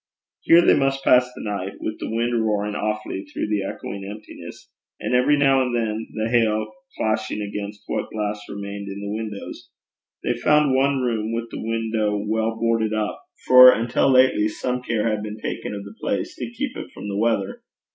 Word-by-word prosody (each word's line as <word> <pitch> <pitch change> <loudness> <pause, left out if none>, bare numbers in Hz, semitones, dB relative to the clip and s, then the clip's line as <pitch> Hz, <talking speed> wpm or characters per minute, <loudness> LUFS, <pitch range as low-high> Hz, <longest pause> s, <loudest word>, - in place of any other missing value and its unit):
Here 170 +1 +5
they - - +6
must 135 0 0
pass 125 0 +5
the - - -8
night, 100 -2 -3
with 110 - -4
the - - -4
wind 115 0 0
roaring 105 -1 0
awfully 105 -2 -3
through - - -4
the 105 -2 0
echoing 100 0 -6
emptiness, 105 +2 -10 0.3
and - - -3
every 130 +4 +4
now 135 -1 +4
and 125 -2 -1
then 110 -1 -2
the 110 0 -1
hail 110 -2 +1 0.3
clashing 110 -1 -1
against 105 0 -5
what - - -3
glass 105 -1 -3
remained 100 0 -6
in 100 0 -6
the 100 0 -4
windows. 110 -2 -7 0.5
They - - +1
found 150 +3 +3
one 135 0 +2
room 115 -3 -1
with 115 0 -4
the - - -6
window 110 -2 -1
well 110 +2 -1
boarded 115 -1 +1
up, 105 -1 -2 0.2
for 125 0 +10
until 120 +4 +1
lately 130 -5 +4
some 125 +3 -3
care 115 -3 -1
had 105 -2 0
been 105 0 -6
taken 105 - -4
of 100 - -6
the 100 +1 -10
place 100 - -2
to - - -6
keep 250 +3 -4
it - - -7
from - - -7
the 100 0 -2
weather. 110 -4 0
110 Hz, 190 wpm, -23 LUFS, 105-120 Hz, 0.5 s, for